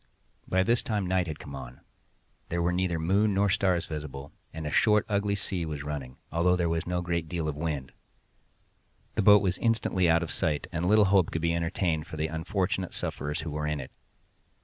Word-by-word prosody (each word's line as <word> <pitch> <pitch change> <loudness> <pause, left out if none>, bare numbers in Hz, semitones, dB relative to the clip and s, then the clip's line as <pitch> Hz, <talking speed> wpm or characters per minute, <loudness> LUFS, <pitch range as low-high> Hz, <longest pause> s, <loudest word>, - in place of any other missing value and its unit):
By 95 0 +2
this 115 +3 +2
time 105 -3 -1
night 90 -1 +1
had 80 -2 -4
come 70 - -10
on—there 65 +5 -10
were 85 - +2
neither 90 -2 0
moon 100 +5 +2
nor 100 +1 +3
stars 90 -3 +2
visible—and 75 +1 -8
a 75 - -2
short 105 +4 +4
and 105 - -1
ugly 100 0 +1
sea 95 -3 -2
was 75 -3 -4
running, 70 -3 -5
although 90 +2 +3
there 85 -1 0
was 85 +1 -1
no 90 0 0
great 85 -2 -2
deal 85 -3 -2
of 75 - -2
wind. 75 -4 -3 1.2
The - - +1
boat 105 -1 +7
was 95 -2 0
instantly 110 -6 +2
out 85 0 +4
of 85 - -5
sight, 75 -2 -1
and 85 +1 -1
little 105 +1 +6
hope 95 -3 +4
could 80 - -3
be 85 0 +2
entertained 85 -1 -1
for 80 -4 -7
the 80 +1 -1
unfortunate 90 +3 -2
sufferers 75 +2 -3
who 80 0 -5
were 75 0 -2
in 75 -1 -1
it. 65 - -8
85 Hz, 200 wpm, -28 LUFS, 75-95 Hz, 1.2 s, boat